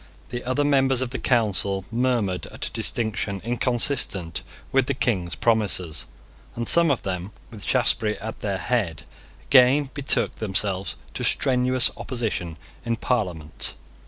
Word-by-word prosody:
The 120 Hz, 0 st, -5 dB
other 130 Hz, +3 st, +1 dB
members 135 Hz, -3 st, +3 dB
of 130 Hz, -2 st, -2 dB
the 130 Hz, -, -4 dB
Council 100 Hz, -5 st, +1 dB
murmured 115 Hz, -8 st, 0 dB
at -, -, -5 dB
a -, -, -8 dB
distinction 110 Hz, -3 st, -2 dB
inconsistent 120 Hz, -, 0 dB, 0.3 s
with 135 Hz, -1 st, +3 dB
the 140 Hz, -, 0 dB
King's 95 Hz, -10 st, 0 dB
promises; 100 Hz, -8 st, +1 dB, 0.5 s
and 120 Hz, 0 st, -3 dB
some 170 Hz, -1 st, +6 dB
of 140 Hz, -, 0 dB
them, 95 Hz, +1 st, -3 dB, 0.2 s
with 110 Hz, -3 st, -9 dB
Shaftesbury 110 Hz, -4 st, +1 dB
at 110 Hz, +1 st, -7 dB
their 100 Hz, -2 st, -2 dB
head, 100 Hz, -8 st, -1 dB, 0.4 s
again 135 Hz, +1 st, +5 dB
betook 140 Hz, -1 st, +2 dB
themselves 100 Hz, -2 st, -1 dB, 0.2 s
to -, -, -3 dB
strenuous 130 Hz, -1 st, +3 dB
opposition 110 Hz, -, -3 dB, 0.3 s
in 115 Hz, 0 st, 0 dB
Parliament. 90 Hz, -, -2 dB
115 Hz, 135 wpm, -24 LUFS, 95-130 Hz, 0.5 s, some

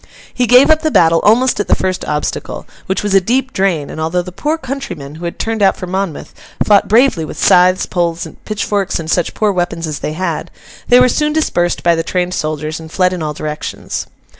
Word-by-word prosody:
He 250 Hz, -1 st, 0 dB
gave 250 Hz, +5 st, +6 dB
up 315 Hz, 0 st, +4 dB
the 315 Hz, -, +1 dB
battle 165 Hz, -, +4 dB
almost 245 Hz, +4 st, +3 dB
at 205 Hz, -, -1 dB
the -, -, +3 dB
first 185 Hz, -1 st, -2 dB
obstacle—which 155 Hz, +5 st, -4 dB
was 205 Hz, -1 st, -1 dB
a 195 Hz, -, +5 dB
deep 260 Hz, +7 st, 0 dB
drain; 180 Hz, -7 st, 0 dB
and 155 Hz, -, -6 dB
although 170 Hz, +3 st, 0 dB
the 180 Hz, -, -9 dB
poor 300 Hz, -, -2 dB
countrymen, 265 Hz, -, -6 dB
who 165 Hz, +3 st, -8 dB
had 170 Hz, -, -5 dB
turned 225 Hz, -1 st, -2 dB
out 195 Hz, -1 st, +3 dB
for 185 Hz, -, -5 dB
Monmouth, 190 Hz, -3 st, -4 dB, 0.3 s
fought 205 Hz, -1 st, +4 dB
bravely 225 Hz, -6 st, +3 dB
with 155 Hz, -, -7 dB
scythes, 180 Hz, +1 st, +4 dB
poles, 170 Hz, -2 st, -2 dB, 0.2 s
pitchforks, 205 Hz, -2 st, -2 dB
and 160 Hz, 0 st, -4 dB
such 175 Hz, -, 0 dB
poor 215 Hz, -1 st, +1 dB
weapons 175 Hz, -2 st, -2 dB
as 155 Hz, -2 st, -4 dB
they 150 Hz, -, -4 dB
had, 170 Hz, -1 st, -3 dB, 0.4 s
they 245 Hz, -, +6 dB
were 250 Hz, -, +6 dB
soon 300 Hz, +4 st, 0 dB
dispersed 175 Hz, -, 0 dB
by 170 Hz, -, +4 dB
the 165 Hz, -, 0 dB
trained 180 Hz, +1 st, -2 dB
soldiers, 155 Hz, -1 st, -3 dB
and 160 Hz, -1 st, -11 dB
fled 185 Hz, 0 st, +1 dB
in 180 Hz, -, -4 dB
all 150 Hz, -1 st, -3 dB
directions. 150 Hz, 0 st, -5 dB
185 Hz, 215 wpm, -15 LUFS, 165-220 Hz, 0.4 s, gave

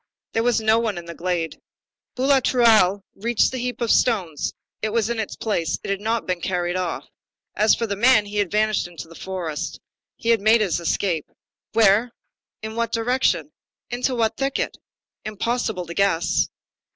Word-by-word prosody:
There 225 Hz, -, +2 dB
was 240 Hz, 0 st, +2 dB
no 220 Hz, +1 st, +3 dB
one 220 Hz, -5 st, -1 dB
in 170 Hz, -, -7 dB
the 170 Hz, -, -7 dB
glade. 170 Hz, -2 st, -3 dB, 0.5 s
Boulatruelle 235 Hz, -7 st, +4 dB
rushed 235 Hz, +3 st, -4 dB
to -, -, +4 dB
the 260 Hz, -, -4 dB
heap 250 Hz, 0 st, -4 dB
of 235 Hz, -, +2 dB
stones. 185 Hz, -, +1 dB, 0.3 s
It 215 Hz, -, 0 dB
was 225 Hz, +1 st, 0 dB
in 235 Hz, -, -2 dB
its 215 Hz, -, -3 dB
place. 185 Hz, -7 st, -1 dB
It -, -, -3 dB
had 195 Hz, 0 st, -2 dB
not 225 Hz, +1 st, -1 dB
been 180 Hz, -1 st, -2 dB
carried 175 Hz, -1 st, -1 dB
off. 180 Hz, -2 st, -2 dB, 0.5 s
As 215 Hz, 0 st, +4 dB
for 230 Hz, -, -2 dB
the 200 Hz, -2 st, -2 dB
man, 220 Hz, 0 st, +5 dB
he 205 Hz, 0 st, -6 dB
had 205 Hz, -3 st, +1 dB
vanished 215 Hz, -1 st, +1 dB
in 175 Hz, -, -16 dB
the 165 Hz, 0 st, -9 dB
forest. 170 Hz, -4 st, -5 dB, 0.4 s
He 230 Hz, -, -4 dB
had 230 Hz, -3 st, +4 dB
made 220 Hz, +2 st, +5 dB
his 185 Hz, -5 st, +1 dB
escape. 170 Hz, -1 st, -1 dB, 0.4 s
Where? 225 Hz, +2 st, +4 dB, 0.5 s
in 220 Hz, 0 st, -5 dB
what 235 Hz, 0 st, -1 dB
direction? 245 Hz, +3 st, +1 dB, 0.4 s
into 250 Hz, +1 st, 0 dB
what 225 Hz, -2 st, 0 dB
thicket? 275 Hz, 0 st, -1 dB, 0.5 s
Impossible 215 Hz, -3 st, -2 dB
to 170 Hz, -, -7 dB
guess. 180 Hz, -3 st, +1 dB
215 Hz, 175 wpm, -23 LUFS, 185-235 Hz, 0.5 s, man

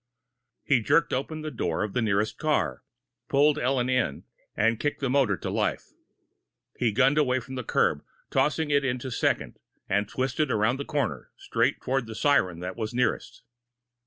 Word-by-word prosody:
He 130 Hz, -5 st, +3 dB
jerked 150 Hz, +8 st, +2 dB
open 155 Hz, +4 st, -3 dB
the 155 Hz, -, -4 dB
door 85 Hz, -, -1 dB
of 105 Hz, -, -4 dB
the 125 Hz, -, 0 dB
nearest 105 Hz, -1 st, 0 dB
car, 155 Hz, -1 st, 0 dB, 0.5 s
pulled 145 Hz, +2 st, +4 dB
Ellen 130 Hz, -2 st, +1 dB
in, 130 Hz, -, 0 dB, 0.3 s
and 115 Hz, +1 st, +2 dB
kicked 145 Hz, -, -1 dB
the 135 Hz, -3 st, -1 dB
motor 130 Hz, -8 st, +2 dB
to -, -, -4 dB
life. -, -, -1 dB, 0.8 s
He 120 Hz, -3 st, +1 dB
gunned 135 Hz, +7 st, +3 dB
away 130 Hz, -3 st, +2 dB
from 130 Hz, +2 st, -10 dB
the 130 Hz, -1 st, -4 dB
curb, -, -, +1 dB, 0.3 s
tossed 135 Hz, +2 st, +2 dB
it 145 Hz, -3 st, +1 dB
into 130 Hz, 0 st, -2 dB
second, -, -, -1 dB, 0.3 s
and 100 Hz, +1 st, 0 dB
twisted 135 Hz, +3 st, -1 dB
around 110 Hz, +3 st, +1 dB
the 140 Hz, -, -5 dB
corner, 145 Hz, -6 st, -2 dB
straight -, -, 0 dB
toward 130 Hz, -2 st, -1 dB
the 110 Hz, -, -7 dB
siren 95 Hz, -, +2 dB
that 90 Hz, +1 st, -5 dB
was 110 Hz, 0 st, -4 dB
nearest. 125 Hz, -, -1 dB
130 Hz, 170 wpm, -27 LUFS, 110-140 Hz, 0.8 s, pulled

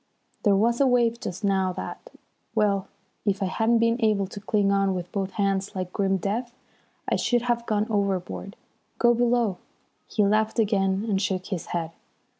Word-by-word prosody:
"There 205 Hz, -2 st, +4 dB
was 235 Hz, +5 st, +2 dB
a 275 Hz, -, +5 dB
wave 235 Hz, -2 st, +2 dB
just 190 Hz, 0 st, -6 dB
now 190 Hz, -2 st, +1 dB
that -, -, -7 dB, 0.5 s
well, 200 Hz, -3 st, +2 dB, 0.4 s
if 200 Hz, -1 st, 0 dB
I -, -, +1 dB
hadn't 225 Hz, +5 st, +2 dB
been 230 Hz, +1 st, +2 dB
able 210 Hz, -3 st, +3 dB
to 200 Hz, +2 st, -8 dB
cling 200 Hz, -1 st, +1 dB
on 195 Hz, -1 st, +2 dB
with 180 Hz, -1 st, -5 dB
both 195 Hz, -1 st, -3 dB
hands 195 Hz, 0 st, -1 dB
like 185 Hz, -1 st, -4 dB
grim 195 Hz, -1 st, +1 dB
death, 235 Hz, +6 st, -3 dB, 0.5 s
I -, -, +1 dB
should 240 Hz, -1 st, +1 dB
have 235 Hz, -1 st, -1 dB
gone 210 Hz, -1 st, +1 dB
overboard. 200 Hz, -1 st, -2 dB, 0.4 s
Go 240 Hz, 0 st, +5 dB
below." 235 Hz, -5 st, +1 dB, 0.5 s
He 210 Hz, -, +1 dB
laughed 215 Hz, +3 st, +1 dB
again 200 Hz, -2 st, +1 dB
and 195 Hz, -3 st, +1 dB
shook 190 Hz, -2 st, -1 dB
his 180 Hz, -4 st, -4 dB
head. 165 Hz, -2 st, -3 dB
200 Hz, 175 wpm, -25 LUFS, 195-230 Hz, 0.5 s, a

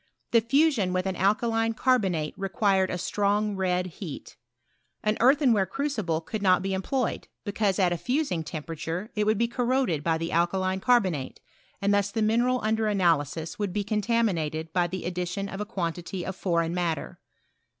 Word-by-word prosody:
The 230 Hz, -, +5 dB
fusion 250 Hz, -, +2 dB
with 185 Hz, 0 st, 0 dB
an 190 Hz, -1 st, -1 dB
alkaline 225 Hz, +4 st, +1 dB
carbonate 190 Hz, -, +1 dB
required 195 Hz, -1 st, +1 dB
a 180 Hz, -, -2 dB
strong 205 Hz, +3 st, 0 dB
red 180 Hz, -1 st, 0 dB
heat. 170 Hz, -3 st, -8 dB, 0.7 s
An 215 Hz, 0 st, +2 dB
earthenware 250 Hz, -6 st, +4 dB
crucible 215 Hz, -, -2 dB
could 210 Hz, +6 st, -5 dB
not 185 Hz, -2 st, +4 dB
be 195 Hz, 0 st, -1 dB
em 190 Hz, -, -1 dB
ployed, 255 Hz, +3 st, -1 dB, 0.2 s
because 205 Hz, -2 st, 0 dB
at 180 Hz, -3 st, +3 dB
a -, -, -2 dB
fusing 250 Hz, -, -1 dB
temperature 165 Hz, +5 st, -5 dB
it 210 Hz, 0 st, 0 dB
would 215 Hz, 0 st, +3 dB
be 235 Hz, +2 st, +2 dB
corroded 240 Hz, -, 0 dB
by 165 Hz, 0 st, +1 dB
the 165 Hz, +1 st, -3 dB
alkaline 185 Hz, +3 st, +1 dB
carbonate, 190 Hz, -, +1 dB, 0.4 s
and 200 Hz, +1 st, +3 dB
thus 200 Hz, 0 st, +2 dB
the 220 Hz, +1 st, -1 dB
mineral 240 Hz, +4 st, +2 dB
under 220 Hz, 0 st, +1 dB
analysis 165 Hz, -5 st, 0 dB
would 200 Hz, -3 st, -2 dB
be 205 Hz, 0 st, 0 dB
contaminated 195 Hz, -7 st, 0 dB
by 175 Hz, -1 st, +2 dB
the 185 Hz, 0 st, -5 dB
addition 180 Hz, +2 st, -3 dB
of 195 Hz, +1 st, -6 dB
a -, -, -2 dB
quantity 175 Hz, -3 st, -4 dB
of 190 Hz, -, -4 dB
foreign 170 Hz, -3 st, 0 dB
matter. 170 Hz, -4 st, -2 dB
195 Hz, 170 wpm, -27 LUFS, 175-220 Hz, 0.7 s, The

